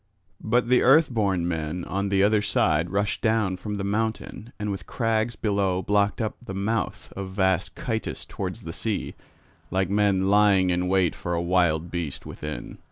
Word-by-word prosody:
But 120 +2 +2
the 125 0 +4
Earthborn 110 - +3
men 80 +1 -3
on 100 +1 -2
the 95 0 +3
other 105 +1 +4
side 80 -4 +2
rushed 100 +1 -1
down 110 -4 +1
from 105 +2 -5
the 100 - -3
mountain 110 +2 -3
and 105 -1 -3
with 95 - -6
crags 115 -1 0
below 100 -3 0
blocked 105 +3 +1
up 110 -2 -2
the 95 -5 -6
mouth 110 +3 -2
of 95 -1 -5
vast 95 -1 0
Chytus 115 -8 -3
towards - - -5
the - - -6
sea, - - -2 0.6
like 95 +1 0
men 100 -2 +2
lying 100 -2 +4
in 90 +1 0
wait 95 -2 +2
for 85 -1 -3
a - - 0
wild 85 -2 +1
beast 85 -5 -4
within. 75 0 -7
100 Hz, 170 wpm, -25 LUFS, 90-110 Hz, 0.6 s, the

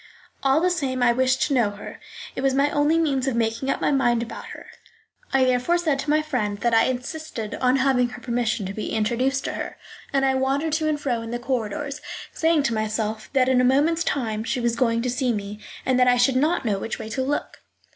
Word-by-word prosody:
All 270 +2 +3
the 360 +1 +2
same, 265 -7 -1
I 240 -1 +5
wished 260 +1 +2
to 290 - 0
know 240 -5 +3
her; 205 0 -9 0.4
it - - -3
was 270 -1 +2
my 280 +1 +2
only 295 +2 +2
means 280 -5 +1
of 265 - 0
making 230 +3 -1
up - - 0
my - - +2
mind 240 -4 +2
about 235 - -8
her. - - -10 0.7
I 270 -1 +3
therefore 255 +7 +2
said 310 -5 0
to 280 - -4
my 305 +1 +3
friend 225 -9 -2
that 235 -1 +1
I 225 - +5
insisted 255 -3 -4
on 255 0 +4
having 260 -2 +2
her 245 - -9
permission 235 -4 -1
to 190 - -4
be 215 - -4
introduced 250 +5 0
to - - -3
her, - - -5 0.3
and 270 -1 +2
I 265 - +3
wandered 275 +4 0
to 315 0 +1
and 300 -1 -1
fro 245 -5 -1
in 230 - -7
the 240 - -2
corridors, 255 +3 -3 0.3
saying 325 -2 +2
to 235 - 0
myself 215 0 -2
that 260 -2 +3
in 255 -1 +4
a - - +2
moment's 295 +6 +3
time 220 -8 -1
she 250 +3 -2
was 235 -1 0
going 230 -2 +1
to 250 - -1
see 250 0 0
me, 205 -1 -4 0.3
and 255 -1 +2
that 250 - +5
I 245 0 +5
should 250 +2 +3
not 300 +2 +1
know 205 -3 0
which 225 - -4
way 220 - -7
to 240 +4 -2
look. 280 +3 -2
255 Hz, 235 wpm, -24 LUFS, 230-275 Hz, 0.7 s, I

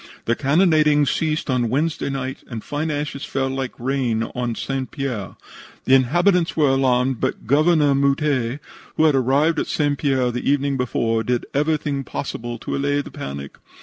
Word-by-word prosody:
The 120 - +1
cannonading 150 -1 +3
ceased 155 +2 -1
on 125 -4 +1
Wednesday 150 +4 -1
night, 135 -1 -4
and 115 -4 -6
fine 150 +2 -3
ashes 145 -2 -3
fell 135 -1 -1
like 135 -1 -4
rain 125 -3 0
on 120 -2 -2
St. 135 +1 -3
Pierre. 125 - -4 0.5
The 130 - +3
inhabitants 170 +8 +3
were 150 -3 +4
alarmed, 130 -2 +2
but - - -2
Governor 150 +3 +3
Mouttet, 140 -2 +1 0.4
who - - +3
had 155 -2 +5
arrived 140 +5 +2
at - - -2
St. 145 -2 0
Pierre 130 -4 +1
the 125 +2 -2
evening 140 0 +1
before, 115 -3 0
did 125 0 -1
everything 145 -1 0
possible 120 -3 -5
to - - -4
allay 145 +1 0
the - - -11
panic. 70 0 -7
135 Hz, 165 wpm, -21 LUFS, 125-150 Hz, 0.5 s, had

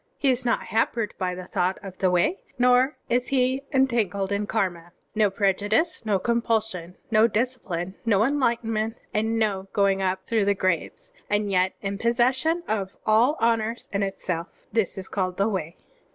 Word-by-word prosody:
H6 275 - +5
is 250 0 -1
not 235 - +1
hampered 225 0 0
by 180 -1 -1
the 185 0 -7
thought 185 0 0
of 190 -2 -9
the 185 - +3
Way, 180 - +2 0.2
nor 250 +3 +4
is 245 +1 +1
he 260 0 +1
entangled 225 -7 +1
in 205 +1 -1
karma. 175 -6 -2 0.2
No 215 -2 +3
prejudice, 205 - 0
no 205 -2 +3
compulsion, 220 -5 -1
no 215 +1 +5
discipline, 210 -7 -2
no 215 -3 +3
enlightenment, 230 -4 0 0.2
and 220 +1 0
no 200 -3 0
going 195 -1 +2
up 190 0 -1
through 220 -3 +1
the 200 0 +2
grades, 185 -3 -2 0.2
and 205 0 +1
yet 185 0 +2
in 200 0 -3
possession 260 +9 +2
of 200 -3 -2
all 235 +8 +4
honors 230 0 0
in 200 - -1
itself, 180 -3 -4
— - - -35
^this 220 -4 0
is 190 - -6
called 185 -2 -2
the 200 - +2
Way. 185 -6 -3
215 Hz, 170 wpm, -25 LUFS, 190-235 Hz, 0.2 s, H6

